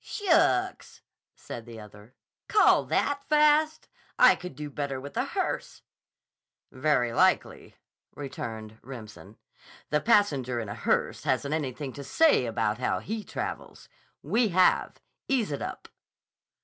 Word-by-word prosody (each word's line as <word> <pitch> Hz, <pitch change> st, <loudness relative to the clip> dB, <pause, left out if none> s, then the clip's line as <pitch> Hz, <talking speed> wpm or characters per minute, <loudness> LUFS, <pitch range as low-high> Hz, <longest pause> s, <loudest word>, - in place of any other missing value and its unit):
"Shucks!" 330 Hz, -, +1 dB, 0.3 s
said 120 Hz, 0 st, -9 dB
the 115 Hz, -1 st, -10 dB
other. 105 Hz, +2 st, -14 dB, 0.3 s
"Call 425 Hz, -, +4 dB
that 285 Hz, 0 st, 0 dB
fast? 305 Hz, +1 st, +3 dB, 0.3 s
I -, -, +8 dB
could 180 Hz, -6 st, -9 dB
do 150 Hz, +1 st, -7 dB
better 140 Hz, -1 st, -3 dB
with 140 Hz, +2 st, -10 dB
a -, -, 0 dB
hearse." -, -, -4 dB, 0.9 s
"Very 130 Hz, -4 st, +1 dB
likely," -, -, +1 dB, 0.4 s
returned 110 Hz, -6 st, -7 dB
Remsen. 110 Hz, -5 st, -11 dB, 0.5 s
"The 150 Hz, -, +2 dB
passenger 140 Hz, -, +2 dB
in 110 Hz, -3 st, -5 dB
a -, -, -4 dB
hearse -, -, -1 dB
hasn't 140 Hz, +3 st, -1 dB
anything 140 Hz, -3 st, -3 dB
to 140 Hz, -, -8 dB
say 140 Hz, -, +3 dB
about 110 Hz, -1 st, -1 dB
how 130 Hz, -, 0 dB
he 220 Hz, +1 st, -5 dB
travels. -, -, -6 dB, 0.3 s
We 235 Hz, 0 st, +2 dB
have. 185 Hz, -1 st, +2 dB, 0.3 s
Ease 245 Hz, -, 0 dB
it 140 Hz, -, -4 dB
up." -, -, -6 dB
140 Hz, 130 wpm, -27 LUFS, -, 0.9 s, I